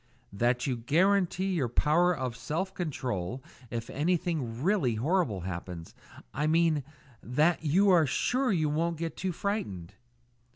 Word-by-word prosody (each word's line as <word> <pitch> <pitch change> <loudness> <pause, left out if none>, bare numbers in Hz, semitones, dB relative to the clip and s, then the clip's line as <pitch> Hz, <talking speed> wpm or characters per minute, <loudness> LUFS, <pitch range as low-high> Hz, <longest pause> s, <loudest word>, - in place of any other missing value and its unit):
"That 120 +4 +1
you 130 -3 -1
guarantee 185 +8 +2
your 140 -9 0
power 160 +8 +3
of 130 -8 -3
self 170 +9 -3
control 125 - -3 0.3
if 115 -1 -4
anything 155 -6 -1
really 165 - +2
horrible 130 - 0
happens. 85 -1 -6 0.4
I 150 - 0
mean 160 -2 +3 0.4
that 155 +8 +1
you 190 +6 +4
are 165 -4 +5
sure 250 - +1
you 160 -5 +1
won't 165 +3 0
get 165 0 -4
too 190 0 -2
frightened." 155 - -3
155 Hz, 135 wpm, -29 LUFS, 120-180 Hz, 0.4 s, are